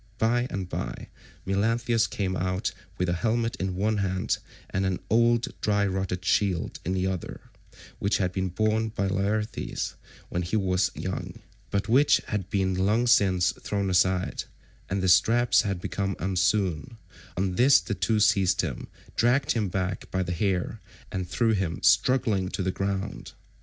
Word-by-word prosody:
By 120 Hz, +2 st, +2 dB
and 95 Hz, -2 st, -4 dB
by -, -, -5 dB, 0.4 s
Melanthius 115 Hz, +3 st, +1 dB
came 95 Hz, -2 st, -2 dB
out 90 Hz, +1 st, -1 dB, 0.2 s
with 90 Hz, -, 0 dB
a 85 Hz, -, +1 dB
helmet 115 Hz, +5 st, 0 dB
in 95 Hz, 0 st, -2 dB
one 105 Hz, +3 st, 0 dB
hand, 95 Hz, -2 st, -1 dB, 0.3 s
and 95 Hz, -, 0 dB
an 95 Hz, -2 st, 0 dB
old 120 Hz, +1 st, +3 dB
dry 100 Hz, -1 st, +2 dB
rotted 95 Hz, -1 st, -2 dB
shield 95 Hz, -5 st, +1 dB
in 90 Hz, -, -2 dB
the 95 Hz, 0 st, 0 dB
other, 95 Hz, -2 st, -5 dB, 0.5 s
which 100 Hz, +1 st, +1 dB
had 90 Hz, -2 st, 0 dB
been 95 Hz, 0 st, -1 dB
borne 110 Hz, +4 st, 0 dB
by 100 Hz, -2 st, -2 dB
Laertes 100 Hz, +3 st, -2 dB, 0.4 s
when 90 Hz, -, -2 dB
he 90 Hz, +5 st, -2 dB
was 95 Hz, -2 st, +2 dB
young, -, -, -5 dB, 0.3 s
but 100 Hz, 0 st, -1 dB
which 135 Hz, +6 st, +5 dB
had 95 Hz, -3 st, -2 dB
been 95 Hz, -2 st, +1 dB
long 105 Hz, +6 st, +2 dB
since 95 Hz, -6 st, +4 dB
thrown 100 Hz, -2 st, -3 dB
aside, 90 Hz, 0 st, +1 dB, 0.4 s
and 95 Hz, 0 st, -1 dB
the -, -, +2 dB
straps 115 Hz, +7 st, +4 dB
had 100 Hz, -5 st, -2 dB
become 95 Hz, +1 st, -2 dB
unsewn; 95 Hz, +2 st, 0 dB, 0.4 s
on 95 Hz, 0 st, 0 dB
this 125 Hz, +3 st, +6 dB
the 85 Hz, +4 st, -4 dB
two 110 Hz, +1 st, +1 dB
seized 100 Hz, -3 st, +3 dB
him, -, -, -4 dB, 0.3 s
dragged 125 Hz, +4 st, +2 dB
him 110 Hz, -5 st, 0 dB
back 95 Hz, 0 st, -3 dB
by 95 Hz, 0 st, -1 dB
the 90 Hz, -, -4 dB
hair, 95 Hz, +3 st, -1 dB, 0.3 s
and 95 Hz, -1 st, -3 dB
threw 115 Hz, -2 st, +2 dB
him 95 Hz, -6 st, -1 dB
struggling 110 Hz, -8 st, +3 dB
to 95 Hz, -, -3 dB
the 95 Hz, -, 0 dB
ground. 100 Hz, +1 st, -4 dB
95 Hz, 165 wpm, -27 LUFS, 95-110 Hz, 0.5 s, this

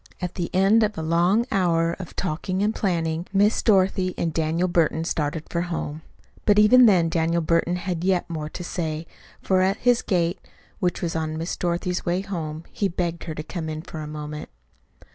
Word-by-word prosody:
At 180 Hz, -1 st, -4 dB
the 175 Hz, -2 st, -3 dB
end 195 Hz, +4 st, +4 dB
of 210 Hz, -1 st, 0 dB
a 160 Hz, -, -3 dB
long 175 Hz, +8 st, +3 dB
hour 170 Hz, -4 st, +2 dB
of 185 Hz, -, -8 dB
talking 185 Hz, +2 st, -2 dB
and 215 Hz, +1 st, +1 dB
planning, 170 Hz, -4 st, -1 dB
Miss 205 Hz, +2 st, +3 dB
Dorothy 190 Hz, -3 st, +2 dB
and 165 Hz, -2 st, -1 dB
Daniel 165 Hz, +3 st, 0 dB
Burton 165 Hz, -2 st, +1 dB
started 155 Hz, -1 st, -2 dB
for 170 Hz, -, 0 dB
home. 160 Hz, -3 st, -4 dB, 0.4 s
But 205 Hz, -1 st, +4 dB
even 235 Hz, +4 st, +7 dB
then 180 Hz, -5 st, +4 dB
Daniel 165 Hz, +1 st, +1 dB
Burton 165 Hz, +2 st, +1 dB
had 180 Hz, -2 st, -3 dB
yet 185 Hz, -1 st, +1 dB
more 155 Hz, -3 st, -4 dB
to 175 Hz, -, -7 dB
say, 160 Hz, -3 st, -3 dB, 0.4 s
for 190 Hz, -1 st, +2 dB
at 190 Hz, +2 st, +2 dB
his 245 Hz, -1 st, +3 dB
gate, 175 Hz, -2 st, 0 dB, 0.4 s
which 180 Hz, -3 st, -1 dB
was 170 Hz, -1 st, -2 dB
on 155 Hz, -1 st, -2 dB
Miss 165 Hz, +2 st, -3 dB
Dorothy's 175 Hz, +1 st, -1 dB
way 175 Hz, +2 st, 0 dB
home, 165 Hz, -5 st, -5 dB
he 200 Hz, -, 0 dB
begged 170 Hz, -2 st, -3 dB
her 160 Hz, -2 st, -5 dB
to 155 Hz, -, -5 dB
come 160 Hz, 0 st, -5 dB
in 155 Hz, 0 st, -5 dB
for 165 Hz, -2 st, -8 dB
a 155 Hz, -, -5 dB
moment. 150 Hz, 0 st, -6 dB
175 Hz, 195 wpm, -24 LUFS, 160-190 Hz, 0.4 s, even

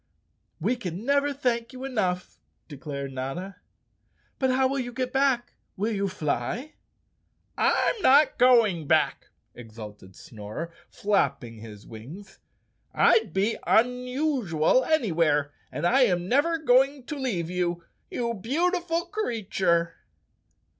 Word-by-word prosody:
"We 215 Hz, +10 st, +1 dB
can 190 Hz, -2 st, -6 dB
never 280 Hz, +1 st, +2 dB
thank 245 Hz, -3 st, -1 dB
you 260 Hz, +1 st, -7 dB
enough," 190 Hz, -9 st, -2 dB, 0.3 s
declared 140 Hz, -2 st, -6 dB
Notta. 135 Hz, +10 st, -5 dB, 0.8 s
"But 265 Hz, -, +2 dB
how 260 Hz, +1 st, +3 dB
will 275 Hz, +1 st, -2 dB
you 245 Hz, -1 st, -4 dB
get 250 Hz, 0 st, -3 dB
back? 265 Hz, -3 st, +1 dB, 0.2 s
Will 210 Hz, +4 st, -1 dB
you 200 Hz, -1 st, 0 dB
fly?" 185 Hz, -, -3 dB, 0.8 s
"I'm 450 Hz, -, +1 dB
not 285 Hz, -1 st, +5 dB
going 225 Hz, -, +4 dB
back," -, -, +1 dB, 0.3 s
exulted 105 Hz, -5 st, -11 dB
Snorer, 110 Hz, -, -8 dB, 0.2 s
flapping 130 Hz, -, -1 dB
his 105 Hz, -2 st, -11 dB
wings. 150 Hz, -, -11 dB, 0.6 s
"I'd 225 Hz, -5 st, +4 dB
be 195 Hz, +6 st, 0 dB
unusual 250 Hz, -, +2 dB
anywhere 165 Hz, -, +1 dB, 0.2 s
and -, -, -3 dB
I 260 Hz, +9 st, +4 dB
am 180 Hz, -4 st, 0 dB
never 290 Hz, -, +2 dB
go¬ 265 Hz, -4 st, +5 dB
ing 275 Hz, -1 st, -10 dB
to 300 Hz, -, -6 dB
leave 200 Hz, -, -2 dB
you, 175 Hz, -1 st, -1 dB, 0.3 s
you 235 Hz, -1 st, -2 dB
beautiful 335 Hz, -, -1 dB
creature." 200 Hz, -, -1 dB
220 Hz, 120 wpm, -26 LUFS, 165-260 Hz, 0.8 s, not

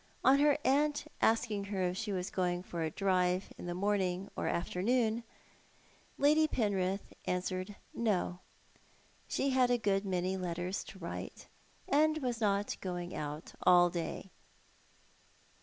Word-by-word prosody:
On 275 Hz, +1 st, +6 dB
her 290 Hz, 0 st, +5 dB
aunt 290 Hz, +2 st, +2 dB, 0.2 s
asking 220 Hz, -3 st, +2 dB
her 200 Hz, -2 st, -2 dB
if 180 Hz, 0 st, 0 dB
she 210 Hz, +2 st, -3 dB
was 185 Hz, -1 st, -2 dB
going 180 Hz, -1 st, 0 dB
for 170 Hz, -2 st, -5 dB
a 160 Hz, -, 0 dB
drive 185 Hz, +1 st, +1 dB
in -, -, -6 dB
the 175 Hz, -, -3 dB
morning 190 Hz, -1 st, 0 dB
or -, -, -2 dB
afternoon, 220 Hz, +6 st, +1 dB, 0.9 s
Lady 305 Hz, +2 st, +5 dB
Penrith 195 Hz, -6 st, -1 dB
answered 185 Hz, +2 st, -2 dB, 0.2 s
" -, -, -33 dB
No." 195 Hz, -5 st, 0 dB, 0.9 s
She 275 Hz, -, 0 dB
had 255 Hz, -1 st, +4 dB
a 245 Hz, -, +3 dB
good 200 Hz, -3 st, +1 dB
many 185 Hz, -1 st, -1 dB
letters 180 Hz, +1 st, -3 dB
to -, -, -11 dB
write, 170 Hz, -3 st, -6 dB, 0.4 s
and 310 Hz, +2 st, +3 dB
was 245 Hz, -5 st, -2 dB
not 205 Hz, -1 st, +1 dB
going 175 Hz, -1 st, -4 dB
out 150 Hz, +2 st, -5 dB
all 175 Hz, -1 st, +6 dB
day. 175 Hz, +2 st, -4 dB
195 Hz, 140 wpm, -33 LUFS, 180-230 Hz, 0.9 s, On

